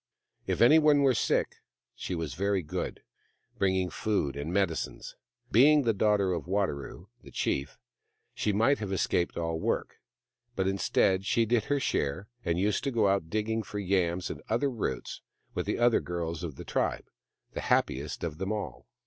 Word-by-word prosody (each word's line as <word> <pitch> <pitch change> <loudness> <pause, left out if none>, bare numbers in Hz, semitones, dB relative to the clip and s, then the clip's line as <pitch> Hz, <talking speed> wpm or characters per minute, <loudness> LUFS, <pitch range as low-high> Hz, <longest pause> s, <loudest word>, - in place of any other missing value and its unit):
If - - -1
anyone 150 +3 +6
were 135 -2 +5
sick 115 - 0 0.4
she 90 - -4
was 80 -5 -3
very 100 +3 0
good, 75 - -4 0.6
bring 95 -1 +2
ing 95 -1 0
food 95 -11 -1
and 70 +3 -4
medicines. 95 -3 -2 0.4
Being 145 +6 +6
the 115 -2 +2
daughter 100 -2 +2
of 85 - -4
Wadaro, 95 -7 -2
the - - -13
chief, 70 0 -2 0.6
she 105 - 0
might 115 +8 +3
have 105 -3 -4
escaped 90 -2 0
all 85 -1 -2
work; - - -2 0.6
but 95 0 0
instead, 95 0 +2
she 115 0 +3
did 115 -1 +1
her 145 0 +1
share, 85 - -1 0.2
and 85 0 0
used 100 +5 +1
to - - +2
go 110 -4 +2
out 95 -5 0
digging 110 +2 -1
for 105 -1 -7
yams 90 -3 0
and - - -8
other 140 -1 +1
roots 105 - -4 0.3
with - - -3
the - - 0
other 120 -1 +4
girls 85 -1 -4
of 80 -5 -5
the - - -9
tribe, - - -1 0.5
the - - -4
happiest 70 +3 0
of 80 -2 -4
them 95 +2 -2
all. 105 -1 -5
95 Hz, 175 wpm, -29 LUFS, 85-110 Hz, 0.6 s, anyone